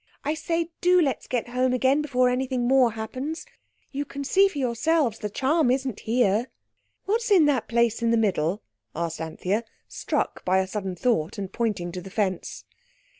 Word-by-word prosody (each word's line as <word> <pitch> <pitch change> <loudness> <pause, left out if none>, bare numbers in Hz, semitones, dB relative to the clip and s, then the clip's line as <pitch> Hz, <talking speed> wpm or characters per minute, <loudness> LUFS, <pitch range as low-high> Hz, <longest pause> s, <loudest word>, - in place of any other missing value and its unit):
I 295 +2 0
say, 330 +1 -2
do 360 +1 +5
let's 285 -6 0
get 245 -1 -2
home 255 +1 +1
again 265 +3 +3
before 255 -4 +2
anything 250 -1 0
more 255 -3 +4
happens. 255 +8 -5 0.5
You 285 +1 -2
can 280 0 -6
see 390 +8 +4
for 385 - -7
yourselves 255 0 +1
the 210 - -3
charm 270 +6 +1
isn't 260 -3 -1
here." 225 0 +1 0.6
"What's 455 +4 0
in 370 -7 +6
that 275 -6 +1
place 235 -1 +1
in 230 - +2
the 230 - +3
middle?" 195 -3 0 0.3
asked 165 0 -3
Anthea, 180 +7 -2 0.2
struck - - -2
by 185 +1 +2
a 190 - +2
sudden 190 -1 -4
thought, 175 -6 0
and 195 -1 -5
pointing 210 -7 -1
to 180 +1 -6
the 195 - -10
fence. 190 -3 -2
245 Hz, 175 wpm, -25 LUFS, 205-280 Hz, 0.6 s, in